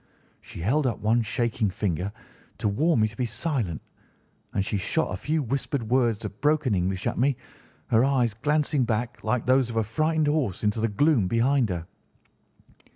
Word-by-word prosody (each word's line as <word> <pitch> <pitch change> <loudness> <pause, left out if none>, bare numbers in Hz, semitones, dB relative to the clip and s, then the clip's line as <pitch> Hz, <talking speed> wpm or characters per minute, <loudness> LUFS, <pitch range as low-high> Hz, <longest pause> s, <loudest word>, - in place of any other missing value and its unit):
She - - -10
held 130 - +2
up 115 - -1
one 115 +3 +2
shaking 110 0 -1
finger 95 -1 -2 0.5
to - - -1
warn 135 +5 +2
me 110 - +4
to 110 - -11
be 125 - -1
silent, 115 - -2 0.7
and 95 - -1
she 105 - -1
shot 160 - -1
a - - -1
few 155 0 -1
whispered 135 +1 -2
words 120 -4 +2
of 105 0 -8
broken 150 -4 +2
English 95 0 -1
at - - -1
me, 135 0 +2 0.5
her 115 +1 +4
eyes 130 -5 +2
glancing 145 +3 +1
back, 120 +1 -2
like 125 -2 0
those 130 -1 +3
of 115 - -4
a 110 - +3
frightened 155 +8 0
horse, 145 - 0
into 105 +1 +1
the 115 - +2
gloom 115 - +2
behind 120 +2 +2
her. 85 -2 -3
120 Hz, 180 wpm, -26 LUFS, 105-140 Hz, 0.7 s, me